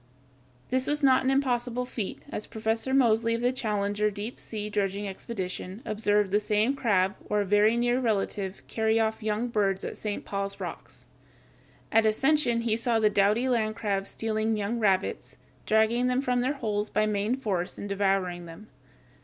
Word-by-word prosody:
This 260 0 +1
was 295 0 0
not 260 -1 +5
an 260 - +1
impossible 250 -2 0
feat, 225 -5 -5
as 210 - -4
Professor 225 +3 -2
Mosely, 230 -3 +3
of 230 - -3
the 245 +1 +2
Challenger 210 -4 0
deep 210 +4 -6
sea 210 -2 -5
dredging 205 -1 -1
expedition, 190 0 -6
observed 210 -2 +1
the 205 - +4
same 215 +5 +1
crab 200 -7 +2 0.2
or 210 0 +2
a - - -1
very 210 +3 +4
near 240 +1 +2
relative, 200 -4 -2
carry 220 0 +1
off 220 0 0
young 215 +2 -1
birds 195 -4 0
at - - -5
St. 210 -1 -4
Paul's 200 0 -3
Rocks. - - -8 0.9
At 225 0 +4
Ascension 245 +1 +2
he 230 -2 +1
saw 230 0 +1
the 215 -1 +3
doughty 210 +5 +3
land 220 -4 +1
crabs 200 -3 -2
stealing 220 0 -1
young 210 +3 -2
rabbits, 195 -3 0 0.3
dragging 220 +3 +3
them 250 +2 +1
from 250 -2 +1
their 260 +3 +1
holes 210 -6 -2
by 215 0 +1
main 210 +3 0
force 195 -9 -2
and 205 - -5
devouring 195 -3 0
them. 170 +6 -12
215 Hz, 170 wpm, -27 LUFS, 205-235 Hz, 0.9 s, not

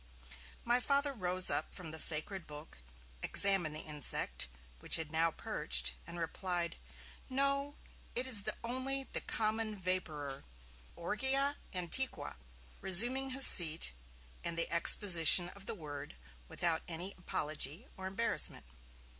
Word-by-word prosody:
My 240 +1 +1
Father 280 +2 -1
rose 185 -4 +3
up - - -3
from 165 -4 -7
the 160 - -4
sacred 165 +5 +4
book, 150 - -13 0.4
examined 190 -6 +2
the - - -2
insect, 150 - 0 0.3
which - - 0
had 160 -2 -5
now 165 +1 +1
perched, 65 - 0
and 170 +1 -8
replied: 175 +1 -4 0.5
'No! 275 +2 -2 0.4
it 245 - -1
is 225 -6 +5 0.2
only 260 +3 -4
the - - -6
common 220 0 -3
Vapourer, 160 -7 -3 0.5
"Orgyia 265 +10 -2
antiqua"!', 185 +9 -4 0.5
resuming 240 +9 +2
his 265 +1 +5
seat, 160 - +7 0.5
and 170 -1 -6
the 165 - -3
exposition 175 0 +5
of 200 +1 -15
the - - -5
Word, 145 - -10 0.3
without 170 - -1
any 175 +3 -7
apology 155 - -5
or 190 0 -7
embarrassment. 210 +5 -2
185 Hz, 125 wpm, -32 LUFS, 160-240 Hz, 0.5 s, seat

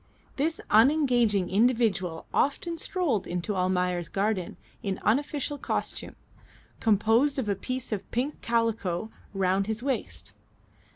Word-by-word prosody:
This 320 +4 0
unengaging 235 - +4
individual 205 -6 +1
often 330 +4 0
strolled 315 - -1
into 180 +4 -2
Almayer's 180 -1 0
garden 200 -2 -1 0.2
in 195 -2 -2
unofficial 285 +4 0
costume, - - -3 0.6
composed 225 +6 +3
of 260 -5 -1
a 200 - +1
piece 255 +6 -4
of 210 -3 -3
pink 260 +5 -2
calico 225 -4 0 0.2
round 195 +1 +1
his 220 +2 -3
waist. 270 -2 -3
220 Hz, 115 wpm, -27 LUFS, 190-265 Hz, 0.6 s, unengaging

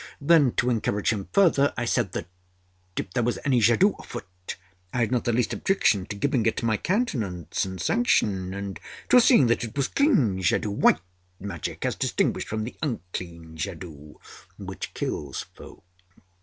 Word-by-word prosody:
Then, 145 -4 +4
to 125 +1 +1
encourage 110 -2 0
him 100 -3 -5
further, 165 -8 +4
I 120 - -1
said 115 -5 0
that, - - -3 0.7
if - - -3
there - - +1
was 120 +1 0
any 130 -4 +3
jadoo 120 - +5
afoot, 90 -6 -8 0.4
I - - -4
had 115 - +1
not 125 -2 0
the 120 - +2
least 120 0 0
objection 105 - +1
to 105 - -5
giving 130 +2 +1
it 115 - 0
my 110 -1 +2
countenance 110 - -1
and 95 -1 -6
sanction, 100 - +1
and 100 0 -5 0.3
to 250 - +7
seeing 235 - +6
that 120 0 +1
it 115 +3 -7
was 140 - +1
clean 130 - +2
jadoo 95 +3 +1
white 100 -4 +3 0.4
magic, 95 -5 -5
as - - +1
distinguished - - 0
from 110 0 -2
the 115 - -6
unclean 85 - -5
jadoo 80 -4 -7 0.4
which - - -6
kills 70 -3 -3
folk. - - -13
110 Hz, 170 wpm, -26 LUFS, 95-130 Hz, 0.7 s, to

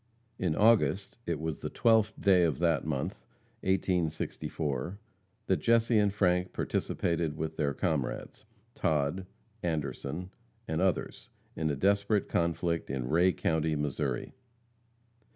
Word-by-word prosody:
] 115 -1 -40
In 80 -3 +1
August 105 -1 +3
it 85 -3 -1
was 80 -2 -3
the - - -4
12th 110 -2 +3
day 95 -3 +5
of 80 -6 +1
that 85 -3 +2
month, 70 -4 -3 0.4
1864, 85 -4 -1 0.5
that 95 - +2
Jesse 115 -1 +3
and 105 -1 +3
Frank 90 -3 +1
participated 85 -3 -1
with 80 0 -3
their 70 -3 0
comrades, 80 -3 -2 0.3
Todd, 80 +3 0 0.3
Anderson 80 +1 -3 0.4
and 80 +2 -1
others, 95 -1 -1 0.3
in 80 -1 -1
a 75 - 0
desperate 100 +6 +2
conflict 85 0 0
in 65 -2 -3
Ray 85 +4 +4
county, 80 -2 0
Missouri. 75 -3 -2
85 Hz, 125 wpm, -30 LUFS, 75-95 Hz, 0.5 s, day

